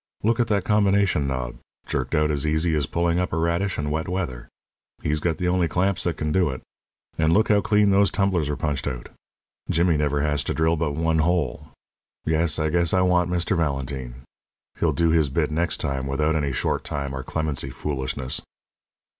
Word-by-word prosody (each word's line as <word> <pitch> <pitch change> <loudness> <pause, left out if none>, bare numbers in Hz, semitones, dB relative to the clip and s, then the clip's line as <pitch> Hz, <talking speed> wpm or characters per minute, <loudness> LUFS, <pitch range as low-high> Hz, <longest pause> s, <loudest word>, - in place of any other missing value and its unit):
Look 115 +2 +2
at 120 - +2
that 100 -3 +1
combination 100 -7 +2
knob 65 -3 -3 0.3
jerked 65 +4 -2
out 75 0 +2
as 75 +1 0
easy 80 +2 +1
as 75 -4 0
pulling 85 0 +1
up 90 - -1
a 80 - -1
radish 85 +4 0
in 75 0 -2
wet 80 +1 -2
weather. 80 -10 -3 0.6
He's 75 +1 0
got 80 +1 -1
the 90 - -1
only 90 -1 +2
clamps 90 +4 0
that 85 -3 -1
can 75 -1 -2
do 90 0 +2
it. 65 -1 -6 0.6
And 80 0 +3
look 110 +6 +3
how 105 -1 +4
clean 105 -1 +3
those 100 +1 +4
tumblers 95 -7 0
were 75 - -1
punched 70 -1 -2
out! 60 -4 -5 0.6
Jimmy 85 -1 +2
never 75 -1 +1
has 75 -1 0
to - - -2
drill 80 +1 +2
but 80 -3 -1
one 80 +1 +1
hole. 85 -4 0 0.6
Yes, 80 -1 +2
I 80 0 0
guess 85 +1 +2
I 95 - +3
want 90 -1 +3
Mr. 90 +1 0
Valentine. 65 -5 -3 0.6
He'll - - +2
do 85 -1 +2
his 80 -3 +3
bit 75 +3 0
next 85 +1 0
time 70 -1 -2
without 75 +4 +1
any 70 -3 0
short 65 - -1
time 70 -2 -4
or 65 - -4
clemency 70 -1 -3
foolishness." 65 -2 -3
80 Hz, 195 wpm, -24 LUFS, 70-90 Hz, 0.6 s, how